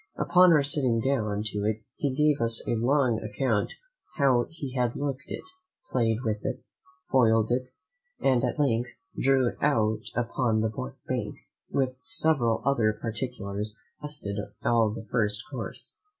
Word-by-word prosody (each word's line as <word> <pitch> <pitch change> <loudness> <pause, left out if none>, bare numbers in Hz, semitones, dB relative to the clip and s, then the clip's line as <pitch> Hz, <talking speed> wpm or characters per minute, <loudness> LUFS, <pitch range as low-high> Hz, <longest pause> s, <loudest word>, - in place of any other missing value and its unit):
Upon 180 +1 +5
our 150 -3 +5
sitting 135 -5 +3
down 110 -5 0
to 105 -1 -2
it 110 0 -1
he 140 -3 -1
gave 150 -1 +3
us 115 0 0
a - - +1
long 120 0 +2
account 105 0 0 0.5
how 130 -4 +3
he 145 -5 -7
had 125 -2 +1
hooked 135 -2 -3
it, - - -5 0.5
played 115 -1 +1
with 110 -3 -2
it, - - -3 0.5
foiled 115 -3 +4
it, 125 +1 0 0.5
and 130 -3 +2
at - - -1
length 120 -5 +1 0.3
drew 135 -1 +3
it - - -10
out 110 -7 +2
upon 115 -1 +1
the 110 0 -1 0.3
bank, - - -2 0.3
with 130 -2 0
several 135 - +2
other 115 -6 +3
particulars 110 -3 -4 0.2
that - - -6
lasted 110 -9 -4 0.3
all 115 -2 +3
the 110 +1 -6
first 105 -1 0
course. - - -6
120 Hz, 150 wpm, -27 LUFS, 110-135 Hz, 0.5 s, Upon